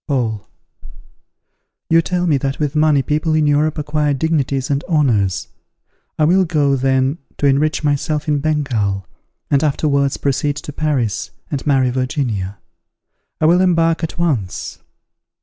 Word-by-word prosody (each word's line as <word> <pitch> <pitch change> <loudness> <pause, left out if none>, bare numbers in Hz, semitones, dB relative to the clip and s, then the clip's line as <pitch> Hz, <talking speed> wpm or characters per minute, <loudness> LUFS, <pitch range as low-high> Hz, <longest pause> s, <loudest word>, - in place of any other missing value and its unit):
Paul. 115 -8 -2 1.4
You 165 +1 +4
tell 180 +2 -1
me 155 -5 +3
that 135 0 -2
with 150 -2 -2
money 150 -2 +3
people 155 +3 0
in 155 -1 +2
Europe 150 +2 +2
acquire 150 -1 0
dignities 140 -2 -1
and 140 +1 0
honours. 120 - +1 0.7
I 155 - +2
will 185 +4 +4
go, 150 -5 +1
then, 135 +3 +1 0.2
to - - -1
enrich 145 +3 +2
myself 150 +1 -1
in 150 -1 +1
Bengal, 125 - -1 0.5
and 140 0 +3
afterwards 140 -2 +1
proceed 140 +1 0
to 150 - -7
Paris, 140 -9 -1 0.2
and 145 0 -3
marry 130 -3 +3
Virginia. 120 - -2 0.8
I - - +1
will 175 +3 +5
embark 165 -2 +2
at 165 - -4
once. 135 - -2
145 Hz, 140 wpm, -18 LUFS, 135-155 Hz, 1.4 s, will